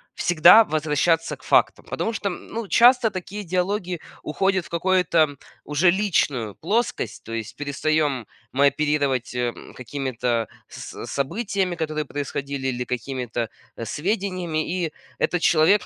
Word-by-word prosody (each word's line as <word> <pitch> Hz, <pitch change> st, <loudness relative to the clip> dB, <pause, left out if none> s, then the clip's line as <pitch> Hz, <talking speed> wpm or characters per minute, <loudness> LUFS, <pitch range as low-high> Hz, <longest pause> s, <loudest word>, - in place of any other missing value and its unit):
всегда 175 Hz, +6 st, +7 dB
возвращаться 155 Hz, 0 st, +1 dB
к -, -, -23 dB
фактам. -, -, +2 dB
Потому 225 Hz, -, -2 dB
что, 200 Hz, -2 st, -2 dB
м, 175 Hz, -, -8 dB
ну 225 Hz, -2 st, -5 dB
часто 240 Hz, -2 st, +6 dB
такие 195 Hz, +3 st, -6 dB
диалоги 180 Hz, 0 st, -1 dB, 0.2 s
уходят 190 Hz, +3 st, 0 dB
в -, -, -13 dB
какое-то, 170 Hz, -4 st, +2 dB, 0.3 s
уже 160 Hz, +4 st, +3 dB
личную 145 Hz, -, 0 dB
плоскость. 220 Hz, +8 st, -1 dB
То 115 Hz, -, -7 dB
есть 115 Hz, -2 st, -5 dB
перестаем 145 Hz, -2 st, 0 dB, 0.3 s
мы 140 Hz, +2 st, +5 dB
оперировать, 140 Hz, -5 st, 0 dB
эм, 120 Hz, -1 st, -3 dB
какими-то 125 Hz, -3 st, -2 dB, 0.2 s
с -, -, -8 dB
событиями, 185 Hz, -, -1 dB
которые 155 Hz, -2 st, -2 dB
происходили, 140 Hz, -1 st, -4 dB
или 125 Hz, -1 st, -2 dB
какими-то, 120 Hz, -2 st, -3 dB, 0.3 s
э, 115 Hz, -, -6 dB
сведениями, 180 Hz, -, -2 dB
и 155 Hz, -, -12 dB, 0.3 s
этот 175 Hz, -1 st, +1 dB
человек 175 Hz, +5 st, +4 dB
155 Hz, 130 wpm, -23 LUFS, 135-185 Hz, 0.3 s, всегда